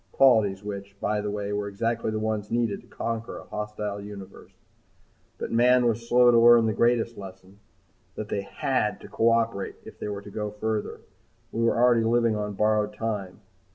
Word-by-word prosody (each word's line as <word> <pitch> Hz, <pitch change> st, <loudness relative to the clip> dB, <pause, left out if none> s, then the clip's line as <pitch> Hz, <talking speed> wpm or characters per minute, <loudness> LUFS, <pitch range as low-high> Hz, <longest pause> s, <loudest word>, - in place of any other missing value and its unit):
Qualities 110 Hz, -7 st, +4 dB
which, 100 Hz, -1 st, -7 dB
by 105 Hz, +1 st, -1 dB
the 105 Hz, -, -3 dB
way, 105 Hz, 0 st, -3 dB
were 105 Hz, 0 st, -2 dB
exactly 115 Hz, +3 st, -2 dB
the 110 Hz, -, -2 dB
ones 110 Hz, -1 st, -2 dB
needed 115 Hz, -3 st, -1 dB
to -, -, -22 dB
conquer 115 Hz, 0 st, -4 dB
a -, -, -9 dB
hostile 105 Hz, -1 st, -5 dB
universe. 100 Hz, -2 st, -10 dB, 0.9 s
But -, -, -5 dB
mankind 125 Hz, +2 st, +4 dB
was 115 Hz, +1 st, -3 dB
slow 125 Hz, 0 st, +6 dB
to 115 Hz, -, +5 dB
learn 120 Hz, 0 st, +7 dB
the 110 Hz, -, +1 dB
greatest 115 Hz, 0 st, +1 dB
lesson, 95 Hz, 0 st, -12 dB, 0.6 s
that 110 Hz, -, -5 dB
they 100 Hz, -, -2 dB
had 105 Hz, +2 st, -1 dB
to -, -, -10 dB
cooperate 115 Hz, -3 st, +1 dB
if -, -, -12 dB
they -, -, -4 dB
were 100 Hz, -1 st, -5 dB
to 105 Hz, -, -11 dB
go 105 Hz, +1 st, -3 dB
further. 105 Hz, 0 st, -3 dB, 0.5 s
We 115 Hz, -, -2 dB
were 115 Hz, 0 st, +2 dB
already 120 Hz, -1 st, +4 dB
living 115 Hz, 0 st, +2 dB
on 105 Hz, -1 st, -3 dB
borrowed 105 Hz, 0 st, +1 dB
time. 105 Hz, -3 st, -4 dB
105 Hz, 185 wpm, -26 LUFS, 105-115 Hz, 0.9 s, learn